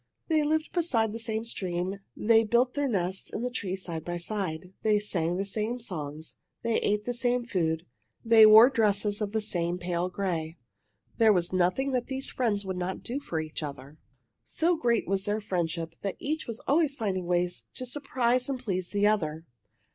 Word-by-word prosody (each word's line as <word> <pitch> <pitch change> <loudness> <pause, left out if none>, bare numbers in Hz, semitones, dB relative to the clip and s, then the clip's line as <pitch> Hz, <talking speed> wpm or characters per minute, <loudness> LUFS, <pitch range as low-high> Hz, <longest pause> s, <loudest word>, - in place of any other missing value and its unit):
They 315 -1 +3
lived 310 +1 0
beside 235 - +1
the 230 - -5
same 220 0 -3
stream. 185 -3 -3 0.2
They 225 0 +4
built 240 +3 +2
their 285 -1 0
nests 190 -5 -2
in 230 - -3
a 250 - -2
tree 190 -6 -2
side 170 -4 -5
by 175 0 -3
side. 180 -1 -4
They 215 -1 +3
sang 175 -4 -1
the 195 - -1
same 220 +4 -2
songs. 160 -8 -6 0.3
They 230 -1 +1
ate 210 0 0
the 245 - -1
same 245 0 0
food. 165 -6 -1 0.4
They 225 -1 +8
wore 220 +4 +9
dresses 210 -3 +1
of 205 -1 -1
the 220 0 0
same 175 -4 -1
pale 175 0 -2
gray. 170 -4 -3 0.6
There 225 -1 +7
was 180 -2 +1
nothing 185 +10 +1
that 250 -2 -1
these 265 0 -3
friends 210 -5 0
would 190 -1 -3
not 180 +1 -3
do 255 +4 -3
for 170 - -3
each 155 0 -5
other. 145 0 -8 0.4
So 345 +2 +1
great 235 -6 +1
was 195 0 0
their 210 +1 0
friendship 170 -4 -2
that 195 - -3
each 310 +2 -3
was 230 -1 -5
always 295 -1 +2
finding 190 -7 -2
ways 175 0 0
to 255 - -4
surprise 255 -1 0
and 270 - -1
please 185 -7 -2
the 205 0 +1
other. 165 -7 +1
205 Hz, 190 wpm, -28 LUFS, 180-240 Hz, 0.6 s, wore